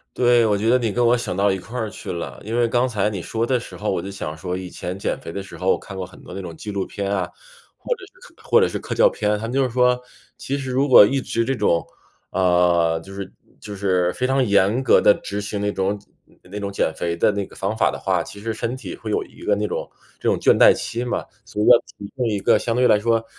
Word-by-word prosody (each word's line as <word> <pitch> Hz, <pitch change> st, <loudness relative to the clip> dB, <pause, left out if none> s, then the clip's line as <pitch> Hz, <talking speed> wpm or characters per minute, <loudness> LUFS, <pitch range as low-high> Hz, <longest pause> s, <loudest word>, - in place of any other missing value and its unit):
对， 120 Hz, -1 st, +4 dB
我 105 Hz, -2 st, +2 dB
觉 105 Hz, +3 st, 0 dB
得 125 Hz, -, +5 dB
你 115 Hz, -4 st, -1 dB
跟 120 Hz, +4 st, +1 dB
我 120 Hz, +1 st, +4 dB
想 100 Hz, -6 st, -4 dB
到 100 Hz, +1 st, +3 dB
一 95 Hz, -, -1 dB
块 110 Hz, +3 st, -5 dB
去 -, -, -7 dB
了。 85 Hz, -, -6 dB
因 110 Hz, +2 st, -3 dB
为 120 Hz, -1 st, +3 dB
刚 120 Hz, +2 st, +2 dB
才 105 Hz, -4 st, 0 dB
你 100 Hz, -3 st, -4 dB
说 110 Hz, +6 st, -3 dB
的 125 Hz, -1 st, +2 dB
时 120 Hz, -, -10 dB
候 105 Hz, -, -3 dB
我 95 Hz, -, 0 dB
就 100 Hz, +3 st, -6 dB
想 80 Hz, -5 st, -6 dB
说 90 Hz, +1 st, -4 dB
以 90 Hz, -1 st, -6 dB
前 90 Hz, +1 st, -6 dB
减 100 Hz, -, -2 dB
肥 -, -, -8 dB
的 100 Hz, -, -5 dB
时 95 Hz, -, -11 dB
候 95 Hz, +1 st, +1 dB
我 -, -, +1 dB
看 100 Hz, -, -10 dB
过 95 Hz, -, -3 dB
很 90 Hz, -, -15 dB
多 -, -, -10 dB
那 -, -, -5 dB
种 85 Hz, -3 st, -8 dB
纪 105 Hz, -, -8 dB
录 100 Hz, -2 st, -2 dB
片 100 Hz, 0 st, -4 dB
啊， 100 Hz, -, 0 dB, 0.5 s
或 -, -, -13 dB
者 485 Hz, -, -12 dB
是 -, -, -19 dB
或 465 Hz, -, +7 dB
者 -, -, +4 dB
是 -, -, -4 dB
科 -, -, -5 dB
教 -, -, +5 dB
片， 105 Hz, -, -1 dB
它 110 Hz, -, -4 dB
们 120 Hz, -, -5 dB
就 135 Hz, 0 st, +3 dB
是 130 Hz, -, -1 dB
说， 125 Hz, 0 st, +3 dB, 0.4 s
其 140 Hz, -, -3 dB
实 135 Hz, -2 st, -4 dB
如 135 Hz, +3 st, +1 dB
果 130 Hz, -, +9 dB
一 135 Hz, +7 st, +2 dB
直 115 Hz, -3 st, -1 dB
这 135 Hz, +3 st, -1 dB
种， 85 Hz, -8 st, +1 dB, 0.5 s
呃， 90 Hz, -3 st, +2 dB
就 95 Hz, -, -12 dB
是 100 Hz, 0 st, -7 dB, 0.3 s
就 105 Hz, -, -8 dB
是 90 Hz, -3 st, +1 dB
非 125 Hz, -, -1 dB
常 135 Hz, 0 st, +2 dB
严 100 Hz, +4 st, +3 dB
格 -, -, +5 dB
地 105 Hz, -, +6 dB
执 100 Hz, +1 st, -5 dB
行 105 Hz, 0 st, -4 dB
那 105 Hz, 0 st, 0 dB
种 100 Hz, +1 st, -1 dB, 0.4 s
那 100 Hz, +3 st, -7 dB
种 100 Hz, -1 st, -4 dB
减 90 Hz, -4 st, 0 dB
肥 85 Hz, 0 st, -2 dB
的 95 Hz, -, +3 dB
那 100 Hz, -1 st, -2 dB
个 -, -, -13 dB
方 100 Hz, +3 st, -2 dB
法 -, -, +3 dB
的 -, -, -4 dB
话， -, -, 0 dB
其 100 Hz, -, -9 dB
实 110 Hz, +2 st, -3 dB
身 115 Hz, +3 st, -3 dB
体 230 Hz, -, -7 dB
会 -, -, -8 dB
有 425 Hz, -, 0 dB
一 -, -, -17 dB
个 430 Hz, +8 st, +1 dB
那 -, -, -1 dB
种 -, -, -4 dB, 0.3 s
那 -, -, +1 dB
种 -, -, +2 dB
倦 -, -, +5 dB
怠 -, -, +9 dB
期 120 Hz, -, -4 dB
嘛。 125 Hz, -, -2 dB, 0.2 s
所 -, -, -7 dB
以 105 Hz, -, +2 dB
要 125 Hz, -, +9 dB, 0.2 s
提 100 Hz, -, -8 dB
供 125 Hz, -3 st, 0 dB
一 105 Hz, -2 st, 0 dB
个 -, -, +3 dB
相 115 Hz, -, -1 dB
对 125 Hz, 0 st, +4 dB
来 105 Hz, -, +5 dB
说， 115 Hz, +1 st, +1 dB
105 Hz, 305 characters per minute, -22 LUFS, 95-125 Hz, 0.5 s, 果